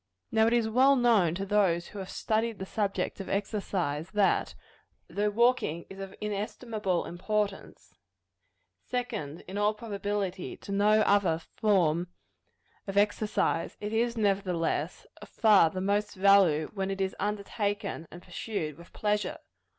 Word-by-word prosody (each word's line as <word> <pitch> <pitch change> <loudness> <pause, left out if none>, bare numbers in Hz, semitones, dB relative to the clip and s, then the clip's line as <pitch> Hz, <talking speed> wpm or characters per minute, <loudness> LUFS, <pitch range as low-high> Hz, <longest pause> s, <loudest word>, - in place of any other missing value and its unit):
Now 220 0 +4
it 230 - +2
is 235 -2 +2
well 260 +5 +5
known 220 -10 +3
to 195 +2 -3
those 190 -4 +2
who 205 - -8
have 190 - -6
studied 225 0 -1
the 190 - -5
subject 200 0 -2
of 195 - -6
exercise, 190 -6 -2
that, 205 -2 +2 0.5
though 210 +1 0
walking 220 -7 +1
is 195 - -10
of 195 0 -7
inestimable 210 -2 -2
importance 205 +3 -3 0.9
second, 215 - -4
in 195 +2 -4
all 210 +1 +2
probability, 205 -3 -3
to - - -9
no 210 +2 +4
other 200 -6 +3
form 175 -2 +1 0.8
of 195 - -4
mere 200 - +7
exercise 210 -5 -1
it 210 +1 -4
is, 235 +1 +1
nevertheless, 195 -5 0 0.2
of - - -11
far 210 -7 +5
the 185 - -5
most 205 +2 0
value, 190 -6 +4
when 195 -2 -2
it 195 0 -3
is 190 -1 -1
undertaken 205 -4 -2
and 175 +1 -12
pursued 175 -5 -4
with 170 - -14
pleasure. 210 0 -1
200 Hz, 145 wpm, -29 LUFS, 185-215 Hz, 0.9 s, mere